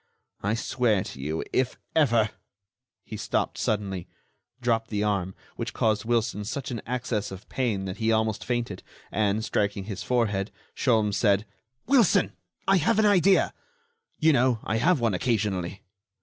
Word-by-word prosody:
I 105 +2 0
swear 115 -4 +1
to - - -9
you 80 +4 -2
if 130 -1 +1 0.2
ever——" 120 -8 +3 0.7
He - - -6
stopped - - -1
suddenly, 100 -4 -1 0.5
dropped 115 -2 0
the 105 -1 -1
arm—which 95 -3 -3
caused 110 -2 +1
Wilson 115 -3 0
such 130 +6 -4
an 115 -3 -3
access 120 -4 -2
of 95 +1 -10
pain 110 -7 -1
that 95 -1 -5
he 110 0 +1
almost 110 -1 +1
fainted—and, 110 -2 -2
striking 100 -2 0
his 100 -1 -6
forehead, 105 -5 0 0.3
Sholmes 110 -6 +2
said: 105 -1 +3 0.4
"Wilson, 230 -7 +4 0.3
I 195 0 +5
have 170 +4 +2
an 220 - +4
idea. 195 -2 +4 0.6
You 160 0 +4
know, 125 -2 +3
I 110 - 0
have 170 +6 +3
one 115 -3 +1
occasionally." 100 -3 -1
110 Hz, 145 wpm, -26 LUFS, 100-125 Hz, 0.7 s, I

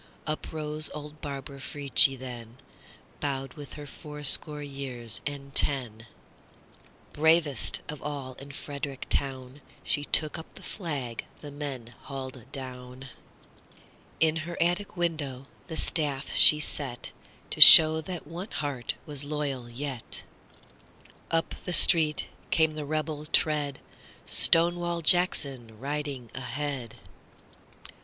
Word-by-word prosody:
Up 155 0 -5
rose 155 -1 -4
old 150 0 -10
Barbara 140 -1 -8
Frietchie 140 -1 +1
then, 120 -2 -11 0.6
Bowed 135 -2 -5
with 145 -3 -12
her 145 0 -10
fourscore 150 +1 +1
years 130 -5 -4
and 140 -1 -9
ten; 115 -7 -2 1.1
Bravest 160 -4 +1
of 150 -1 -9
all 140 -3 -7
in 140 +1 -12
Frederick 140 -1 -8
town, 135 0 -4 0.2
She 145 - -1
took 155 +2 0
up 160 - -14
the - - -15
flag 140 - -6 0.2
the 145 - -10
men 135 -5 -8
hauled 130 -3 -9
down; 130 0 -9 1.1
In 160 0 +1
her 170 +2 -7
attic 175 +3 -2
window 150 -6 -4 0.2
the 160 -2 -7
staff 145 -4 -1
she 150 - +8
set, 135 -5 -4 0.4
To - - -4
show 160 0 +13
that 175 +1 -8
one 175 +7 -9
heart 140 -5 -5
was 145 -3 -5
loyal 145 -4 -5
yet. 130 0 -7 1.1
Up 165 0 -2
the 180 - -3
street 155 -3 +6 0.2
came 160 -1 +1
the 150 -1 -7
rebel 155 0 -5
tread, 150 -3 +1 0.5
Stonewall 170 0 +1
Jackson 135 -10 +1
riding 140 -3 -6
ahead. 130 -2 -6
145 Hz, 120 wpm, -26 LUFS, 130-155 Hz, 1.1 s, show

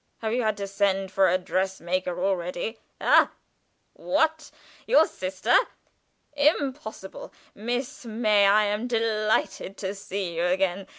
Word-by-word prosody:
Have 220 0 -1
you 250 - +1
had 215 -2 0
to 200 - -3
send 195 -1 0
for 190 0 +3
a 185 - +3
dress 190 +1 -2
maker 180 0 -2
already? 190 +4 -2 0.2
Ha! - - +5 0.6
what? 315 +2 0 0.4
Your 390 -10 +6
sister? 185 0 -1 0.8
Impossible! 280 -8 -1 0.2
Miss 245 +5 -4
May, 215 -3 +3
I 210 +2 +5
am 210 +3 -1
delighted 215 -4 0
to 190 -1 -3
see 195 -3 -5
you 170 - +1
again! 185 +1 0
200 Hz, 130 wpm, -26 LUFS, 190-230 Hz, 0.8 s, Your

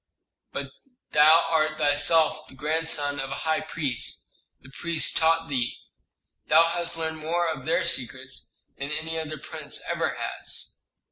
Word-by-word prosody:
"But 140 -1 -5 0.4
thou 160 +3 +7
art 155 -1 +1
thyself 155 +1 +3
the - - -14
grandson 150 -1 0
of 135 0 -3
a 135 - -3
high 160 0 +2
priest; 150 -6 -2 0.3
the 135 - -16
priests 170 +2 +1
taught 165 0 +3
thee. 125 -5 -1 0.7
Thou 165 - +7
hast 170 -1 -2
learned 160 -1 -3
more 170 +2 0
of 145 -5 -4
their - - +2
secrets - - -1 0.2
than 140 +1 -3
any 160 +2 -3
other 155 -1 -5
prince - - -3
ever - - -1
has." - - -4
155 Hz, 145 wpm, -26 LUFS, 145-165 Hz, 0.7 s, thou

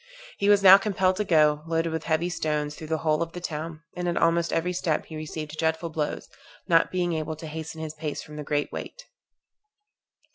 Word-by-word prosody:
He 200 - +2
was 205 -1 +5
now 195 +1 +10
compelled 190 -3 +1
to 210 - +1
go, 150 -5 +3
loaded 165 0 0
with 160 0 -3
heavy 160 +2 +1
stones, 150 -3 -1
through 155 - -9
the 160 0 0
whole 155 -1 +2
of 165 0 -3
the 180 - -5
town; 160 -1 -5
and 180 0 -3
at 175 - 0
almost 170 0 +2
every 180 +2 0
step 175 -3 -1
he 160 - -9
received 155 0 -6
dreadful 160 +1 0
blows, 155 -2 -3 0.4
not 165 -1 +4
being 175 -2 0
able 160 0 -3
to 160 - -9
hasten 160 +1 -6
his 155 -1 -5
pace 155 -1 -5
from 150 - -11
the 150 - -5
great 145 0 -1
weight. - - -7
160 Hz, 210 wpm, -26 LUFS, 155-175 Hz, 0.4 s, now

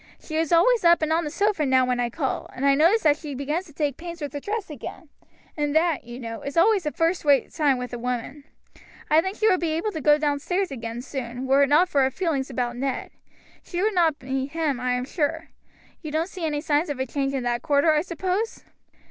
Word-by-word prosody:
She 310 - -8
is 320 -1 0
always 435 +8 +4
up 340 -1 +5
and 315 +1 +1
on 330 0 +1
the - - -2
sofa 400 +1 0
now 260 -2 +3
when 250 -1 0
I 240 -1 0
call, 265 +2 -3
and 265 - -2
I 280 - +5
notice 335 +10 +4
that 300 -2 +4
she 300 -3 -7
begins 300 +7 -2
to 300 - -16
take 290 -3 -1
pains 340 0 -8
with 290 -4 -5
her 290 - -3
dress 415 +6 -4
again; 295 +2 -9 0.5
and 295 -1 -1
that, 320 -4 +2
you 240 +1 -8
know, 230 -2 -6
is 280 +3 -6
always 385 -1 +4
a - - 0
first 330 +3 0
rate 285 -2 +3
sign 290 -5 +2
with 250 -1 -6
a 240 - -4
woman. 250 +4 -4 0.7
I 310 +1 +6
think 380 +4 -4
she 435 - +2
would 370 -4 +4
be 330 -2 -1
able 340 +7 -1
to 320 -5 -5
go 295 +1 +5
downstairs 300 +5 -1
again 235 -2 -5
soon, 255 -2 -5
were 270 +1 +4
it 280 - +4
not 320 +6 +5
for 285 -6 +2
her 265 - +3
feeling 305 -2 -1
about 245 -2 -2
Ned. 265 0 -3 0.5
She 350 - -5
would 435 0 +2
not 325 -6 +2
meet 265 +2 -3
him, 310 -6 -1
I 250 0 0
am 250 0 -1
sure. 320 +2 -2 0.5
You 310 - -6
don't 320 +4 -1
see 355 -4 -4
any 295 -1 -2
signs 300 +2 +1
of 285 -3 -4
a 260 - 0
change 275 +1 -2
in 260 - -2
that 240 0 -1
quarter, 295 0 +3
I 305 -1 +3
suppose?" 370 +6 -3
295 Hz, 245 wpm, -24 LUFS, 265-335 Hz, 0.7 s, I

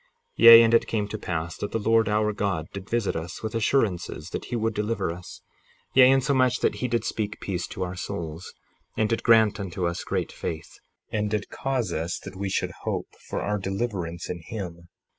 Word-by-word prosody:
58:11 - - -37 0.4
Yea, 115 0 +12
and 115 0 +3
it 115 - +4
came 105 -2 -1
to 110 - -5
pass 80 -1 -3
that 105 - -4
the - - 0
Lord 115 +1 +3
our 105 0 +1
God 100 -6 -1
did 100 0 -8
visit 115 -3 0
us 80 +5 -6
with 110 - -3
assurances 100 - 0
that - - -4
he 120 - -4
would 115 -1 0
deliver 105 -3 -1
us; 85 +1 -10 0.5
yea, 130 -1 +8
insomuch 130 -2 +3
that - - +1
he 125 - +1
did 120 -2 0
speak 105 -1 -3
peace 90 -3 -3
to 95 - -4
our 90 0 -4
souls, 85 -1 -5 0.5
and 110 - +2
did 115 - 0
grant 110 -2 +4
unto 95 -2 -3
us 85 0 -2
great - - -2
faith, 80 -1 -6 0.3
and 105 -1 0
did 105 0 -3
cause 135 -4 -2
us 80 +2 -2
that - - -10
we 100 +1 -3
should - - -1
hope - - -3 0.2
for - - -3
our 105 0 -1
deliverance 95 -4 -3
in 90 -1 -5
him. 85 -5 -7
105 Hz, 205 wpm, -26 LUFS, 90-115 Hz, 0.5 s, Yea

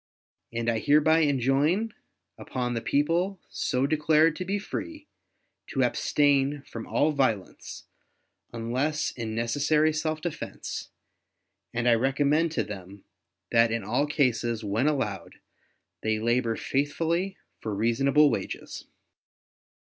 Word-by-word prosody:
And 115 0 -3
I 115 -1 +1
hereby 150 +5 +4
enjoin 145 - +2 0.4
upon 125 -1 -3
the 115 - -2
people 170 - +1
so 125 +1 0
declared 155 +1 +3
to 185 - -4
be 195 +3 -1
free, 305 +9 -6 0.6
to - - 0
abstain 145 -1 +2
from 115 -4 -8
all 155 +2 +2
violence, 130 -9 -2 0.7
unless 130 +7 -1
in 110 -3 -5
necessary 145 +7 +2
self 155 0 -1
defense; 170 0 -5 0.8
and 120 0 -1
I 120 - +6
recommend 140 +6 +2
to - - 0
them 100 -1 -9 0.5
that 115 0 +5
in 115 -2 -1
all 125 +9 0
cases, 120 -6 0
when 110 +7 0
allowed, 105 - -2 0.7
they 110 0 0
labor 115 +1 +1
faithfully 165 +9 -1 0.2
for 110 -2 -4
reasonable 135 +7 +3
wages. - - -5
140 Hz, 115 wpm, -27 LUFS, 115-155 Hz, 0.8 s, I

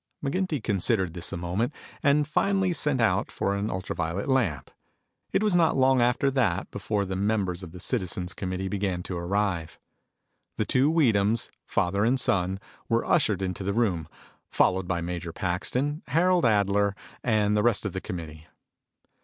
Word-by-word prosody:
McGinty 150 - -1
considered 95 -3 0
this 85 -1 -5
a - - -3
moment, 95 - -2 0.3
and 145 +1 +3
finally 190 +3 +1
sent 150 -4 0
out 105 -3 +2
for 100 - -1
an 100 +2 -2
ultra 90 +1 -4
violet 85 - -2
lamp. 110 - 0 0.6
It - - +2
was 210 -4 +2
not 165 -4 +3
long 130 -1 +4
after 125 +3 +2
that 105 -9 0
before 100 0 -1
the 95 0 -4
members 100 -2 0
of 90 -3 -9
the 90 - -10
citizens 90 -4 -2
committee 95 +1 -3
began 95 -3 -2
to 90 - -5
arrive. 90 -2 -1 0.8
The - - 0
two 135 +4 +3
Weedhams, 115 -8 +2 0.2
father 100 +3 +1
and 125 +4 +2
son, 95 -3 0 0.3
were 115 0 +2
ushered 100 -3 +2
into 95 0 -3
the 100 +1 -1
room, 95 -9 0 0.4
followed 95 0 +2
by 85 -2 -1
Major 85 0 -4
Paxton, 125 - -2
Harold 175 +3 +3
Adler, 100 -2 +2 0.3
and 105 -3 +2
the 105 - +3
rest 115 -1 +2
of 100 - -2
the 95 - -3
committee. 80 -3 -7
100 Hz, 165 wpm, -27 LUFS, 90-125 Hz, 0.8 s, long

